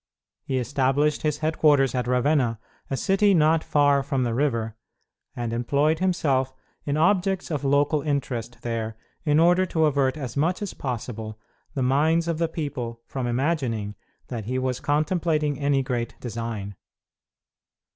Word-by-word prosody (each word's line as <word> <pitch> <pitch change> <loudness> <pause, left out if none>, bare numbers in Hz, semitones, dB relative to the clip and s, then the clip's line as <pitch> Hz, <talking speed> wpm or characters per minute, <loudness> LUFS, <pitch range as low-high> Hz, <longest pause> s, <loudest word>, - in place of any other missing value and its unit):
He 130 - -2
established 135 +4 +1
his 150 -2 0
headquarters 150 -3 +3
at 125 -2 -1
Ravenna, 125 -2 +2 0.3
a 135 - -1
city 195 - +3
not 160 0 +3
far 145 -1 +3
from 135 -1 -1
the 120 -2 -1
river, 115 -4 0 0.6
and 120 -1 -3
employed 145 +7 +1
himself 140 -8 +1 0.3
in 145 +1 0
objects 185 +2 +1
of 145 -2 -2
local 145 +2 +2
interest 125 -6 -3
there 115 -2 -3 0.3
in 150 0 +3
order 175 +3 +5
to 160 -2 +2
avert 140 -2 +1
as 130 -6 -5
much 170 +8 0
as 200 - -4
possible 110 -4 -5 0.4
the 135 - 0
minds 155 +6 +2
of 165 -1 -1
the 165 -1 +1
people 130 -8 -4
from 130 -2 -4
imagining 120 -5 -1 0.4
that 115 -4 -4
he 130 +3 -2
was 130 -1 -1
contemplating 155 -1 0
any 140 -1 +2
great 120 -3 -3
design. 115 -4 -5
140 Hz, 145 wpm, -25 LUFS, 120-155 Hz, 0.6 s, order